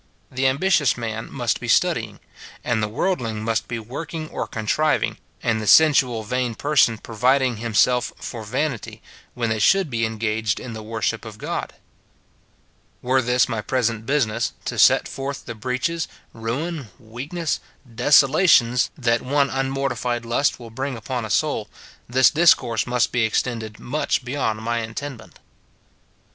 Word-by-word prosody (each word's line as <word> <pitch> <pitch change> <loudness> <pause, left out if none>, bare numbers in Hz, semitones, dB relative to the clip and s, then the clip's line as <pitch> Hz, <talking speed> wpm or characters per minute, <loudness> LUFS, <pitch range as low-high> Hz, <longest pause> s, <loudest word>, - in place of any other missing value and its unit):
The 130 +1 +1
ambitious 145 +1 +2
man 115 -1 -5
must 120 -4 -1
be 120 - -6
studying, 120 - +1 0.4
and 115 -2 0
the 105 - 0
worldling 115 - -2
must 110 0 -1
be 120 - -3
working 155 +8 -6
or - - -4
contriving, 125 +8 0 0.2
and 110 -1 +1
the 105 - -5
sensual, 130 -7 +5
vain 125 +1 -2
person 135 -4 +3
providing 125 +3 +1
himself 120 +2 +2
for 115 -3 -6
vanity, 125 +2 -3 0.3
when 115 -2 -1
they 110 - -1
should 190 - +3
be 115 -1 -1
en 110 0 -2
gaged 110 -1 -1
in 125 - -7
the 110 - -7
worship 110 -1 -2
of - - -9
God. - - -4 1.3
Were 130 +1 +2
this 125 +1 +2
my 115 -4 -2
present 115 -2 -1
business, 120 -5 0
to - - -3
set - - +5
forth 135 0 -5
the 120 - -5
breaches, 130 +9 -2 0.3
ruin, 130 +5 -4
weakness, 135 +9 -4 0.3
desolations, 130 0 +4
that 120 -4 +1
one 140 +1 +1
unmortified 135 -3 -2
lust 120 +5 +1
will 115 -2 -10
bring 130 +2 -4
upon 120 +1 -4
a - - -7
soul, 110 -2 0 0.4
this 130 +1 +5
discourse 130 -9 +3
must 125 -1 +1
be 120 - +1
extended 110 -1 -1
much 130 0 -1
beyond 120 -5 -2
my 115 +1 0
intendment. 115 -2 -7
120 Hz, 150 wpm, -22 LUFS, 110-135 Hz, 1.3 s, sensual